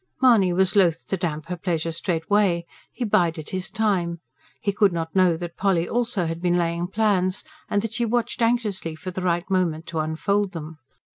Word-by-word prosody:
Mahony 230 -8 +5
was 190 +2 +2
loath 175 -5 +3
to - - +1
damp 165 -4 -3
her 180 +1 -4
pleasure 165 -2 -2
straightway; 170 +2 +1 0.3
he 245 - -3
bided 170 -6 +1
his 185 +1 -2
time. 185 -6 0 0.4
He 200 - 0
could 200 0 +3
not 165 0 -4
know 180 -3 +4
that 170 0 -7
Polly 185 -4 +1
also 230 -6 0
had 165 +1 -4
been 175 -1 +2
laying 170 0 0
plans, 190 -2 +1 0.3
and 205 0 +1
that 225 -1 -3
she 240 +1 0
watched 240 +1 -1
anxiously 220 -8 0
for 185 +4 -6
the 185 - -4
right 175 0 0
moment 170 -4 +1
to 165 - -2
unfold 185 +6 0
them. 160 -1 -7
180 Hz, 190 wpm, -24 LUFS, 170-205 Hz, 0.4 s, Mahony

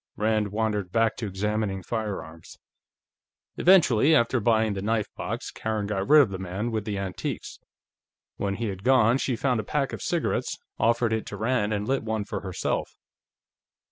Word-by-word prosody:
Rand 110 0 +1
wandered 105 -3 -2
back 115 +1 +2
to 110 - -3
examining 100 0 -2
firearms. 100 -8 -5 1.0
Eventually, 160 - +5
after 120 -1 +3
buying 110 -1 +2
the 95 - -4
knife 110 +1 -1
box, - - -4
Karen 110 -2 -3
got 100 -1 -2
rid 150 0 +8
of 110 - -4
the 95 - -5
man 95 +5 -3
with 110 -2 -2
the 105 -2 -3
antiques. 95 -2 -5 0.8
When 100 -1 -1
he 115 +1 -2
had 95 -1 -7
gone, 125 -1 +4
she 130 - 0
found 125 0 0
a - - -2
pack 140 +4 -1
of - - -5
cigarettes, - - -1 0.2
offered 115 -1 +2
it 110 - -2
to 100 - -6
Rand 110 -1 0
and 105 0 -2
lit 135 0 +1
one 110 -2 -2
for - - -4
herself. 95 -3 -3
110 Hz, 175 wpm, -26 LUFS, 100-115 Hz, 1.0 s, rid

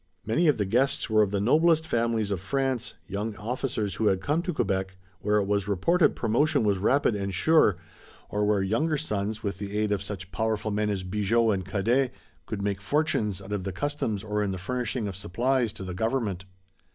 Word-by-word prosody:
Many 155 - +2
of 150 - +4
the 105 - 0
guests 125 +4 +1
were 110 0 +5
of 105 - +3
the 100 0 -1
noblest 160 +8 +4
families 115 -5 0
of 100 - -1
France, 130 +4 -1
young 105 +2 -3
officers 110 -2 -2
who 110 - 0
had 95 -2 +3
come 150 - 0
to 180 - -2
Quebec, 95 - -1 0.2
where 105 +1 +1
it 100 - +2
was 100 -1 0
reported 160 - +3
promotion 140 +5 +2
was 100 -3 +2
rapid 130 +5 +3
and 100 -1 -2
sure, 105 - +4 0.5
or 105 0 -1
where 105 -2 +2
younger 150 +11 +1
sons, 105 -6 -2
with 100 -3 -3
the 100 0 -4
aid 105 -1 +1
of 100 -2 0
such 100 -2 -6
powerful 110 -1 -1
men 105 +1 0
as 100 -2 -2
Bigot 105 +4 +2
and 95 -2 -3
Cadet, 120 +7 +1 0.4
could 100 -2 -4
make 100 -1 -1
fortunes 105 - 0
out 100 +2 -6
of 100 -2 -2
the 95 - -3
customs 110 - -2
or 105 -1 -1
in 105 - 0
the 95 - -3
furnishing 120 +3 -2
of 100 - -5
supplies 120 +6 0
to - - -8
the 95 -1 -5
government. 105 -2 -1
105 Hz, 205 wpm, -27 LUFS, 100-125 Hz, 0.5 s, were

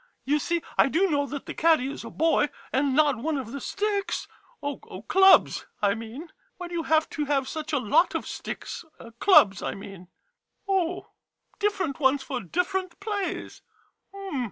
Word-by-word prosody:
You 295 +2 +2
see, 340 +3 -1 0.2
I - - +7
do 360 +5 +2
know 285 -1 +1
that 285 0 -6
the - - -6
caddy 315 -5 +3
is - - -7
a - - -7
boy, 320 -2 +2 0.2
and 270 0 +2
not 295 -3 +4
one 305 +4 -1
of 250 -4 -5
the 280 - -6
sticks 405 - -2 0.2
— - - -32
oh, 285 -1 -3 0.3
clubs, 385 0 +5
I 200 -1 +3
mean. 230 +9 -8 0.3
Why 355 -1 -6
do - - -9
you 340 - 0
have 315 -1 +2
to 300 - -2
have 275 -2 0
such 310 -1 -5
a 295 - +2
lot 280 - +2
of - - -2
sticks - - -6 0.2
— 230 0 -14
clubs, 200 - +6
I - - -3
mean? 195 -2 -10 0.6
Oh, 365 -2 0 0.5
different 405 -9 -1
ones 270 -1 +3
for 255 -3 -4
different 360 - -2
plays. 405 -2 -4
305 Hz, 180 wpm, -26 LUFS, 265-360 Hz, 0.6 s, I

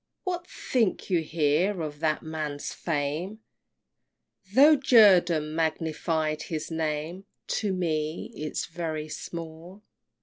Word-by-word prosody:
What 355 -2 -3
think 225 -5 -1
you 175 - +4
here 160 +5 +1
of 150 -1 -6
that 155 -1 0
man's 155 -2 -4
fame? 165 +7 -3 1.1
Tho' 290 +7 +7
Jerdan 185 - +5
magnified 160 -1 -1
his 160 0 -5
name, 160 +3 -3 0.3
To 210 -3 -1
me 160 -3 -2
'tis 155 0 -3
very 160 -2 -4
small! 170 +5 -8
160 Hz, 105 wpm, -27 LUFS, 155-190 Hz, 1.1 s, Tho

